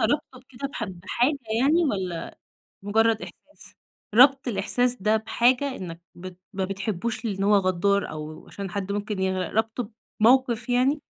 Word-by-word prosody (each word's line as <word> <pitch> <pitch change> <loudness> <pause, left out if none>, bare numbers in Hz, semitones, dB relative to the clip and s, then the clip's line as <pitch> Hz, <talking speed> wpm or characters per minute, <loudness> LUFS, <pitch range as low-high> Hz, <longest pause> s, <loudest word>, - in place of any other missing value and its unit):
رابطه 255 +2 -1
بكده 260 +1 -7
بحد 210 - -6
بحاجة 245 +10 +1 0.2
يعني 315 +6 +4
والّا 185 - -3 0.5
مجرّد 220 +2 +2
إحساس؟ - - -12 0.4
رابط 270 +2 +6
الإحساس 245 +2 +1
ده 215 +2 +3
بحاجة 250 +5 +1
إنّك 170 -2 -7
بت 180 +1 -10
ما 190 -1 -2
بتحبوش 205 +4 -3
لإن 195 -3 -2
هو 205 +1 +4
غدّار، 195 +1 +1
أو 155 0 -8
عشان 195 -2 -7
حد 200 +1 -3
ممكن 205 -1 -3
يغرق، 185 -2 -1
رابطه 220 +1 -1 0.3
بموقف 245 +1 +3
يعني؟ 255 +4 +2
215 Hz, 145 wpm, -25 LUFS, 190-250 Hz, 0.5 s, رابط